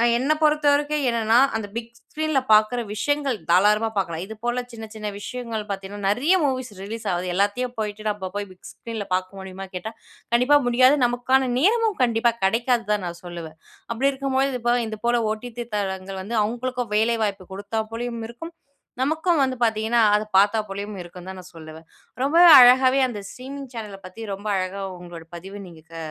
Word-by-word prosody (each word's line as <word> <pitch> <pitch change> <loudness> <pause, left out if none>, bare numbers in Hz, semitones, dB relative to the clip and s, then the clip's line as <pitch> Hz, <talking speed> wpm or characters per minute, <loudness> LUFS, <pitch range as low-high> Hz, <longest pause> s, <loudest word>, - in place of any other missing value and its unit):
அ - - +3
என்ன 265 +5 +1
பொறுத்த 300 -1 +3
வரைக்கும் 295 0 0
என்னன்னா, 225 0 +2 0.2
அந்த 220 -2 -3
பிக் 230 0 -5
ஸ்க்ரீன்ல 310 -1 -1
பாக்குற 215 +3 +4
விஷயங்கள் 285 +2 0
தாராளமா 210 +5 +4
பார்க்கலாம். 170 -4 -2
இது 220 - -8
போல 240 +1 0
சின்ன, 225 -1 -8
சின்ன 215 -1 -5
விஷயங்கள் 230 -2 -5
பாத்தீங்கன்னா, 200 +1 -6
நெறைய 265 - +3
மூவிஸ் 255 -4 -2
ரிலீஸ் 220 +3 -7
ஆவுது. 180 +1 -2
எல்லாத்தையும் 225 +6 0
போய்ட்டு 215 0 -4
நம்ம 190 -3 -4
போய் 205 -1 -3
பிக் 185 - -13
ஸ்க்ரீன்ல 225 -3 -6
பாக்க 185 0 -1
முடியுமான்னு 190 0 -9
கேட்டா, 220 +5 -5 0.4
கண்டிப்பா 255 +5 +5
முடியாது. 255 +4 +5
நமக்கான 250 +2 +1
நேரமும் 435 - +2
கண்டிப்பா 235 -1 +2
கெடைக்காது 235 +4 +1
தான், 205 -3 -1
நான் 170 0 -7
சொல்லுவேன். 165 -3 -8 0.3
அப்படி 265 +4 +1
இருக்கும்பொழுது 270 -1 -1
இப்போ, 240 0 +2
இதுபோல 235 +2 0
ஓடிடி 240 +2 -6
தளங்கள் 190 -1 -4
வந்து, 225 +4 -4
அவங்களுக்கும் 245 +1 -3
வேலை 230 +2 +2
வாய்ப்பு 195 -3 -3
குடுத்தா 205 +3 -3
போலயும் 235 0 -4
இருக்கும். 325 +9 -9 0.5
நமக்கும் 315 +4 +1
வந்து 260 -1 0
பாத்தீங்கன்னா, 225 +1 +1 0.2
அத 210 - +2
பாத்தா 205 +3 +4
போலயும் 200 +2 -5
இருக்கும்ன்னு 175 +1 -10
தான், 190 - -8
நான் 185 0 -15
சொல்லுவேன். 160 0 -11 0.4
ரொம்பவே 335 +6 +6
அழகாவே, 255 +2 +6
அந்த 220 -4 -6
ஸ்ட்ரீமிங் 275 +2 -8
சேனல 210 -4 -7
பத்தி 185 +5 -10
ரொம்ப 200 +2 -6
அழகா 190 +1 -3 0.2
உங்களோட 175 -2 -10
பதிவ 195 +4 -9
நீங்க 165 -2 -14
க - - -9
225 Hz, 170 wpm, -23 LUFS, 195-255 Hz, 0.5 s, ரொம்பவே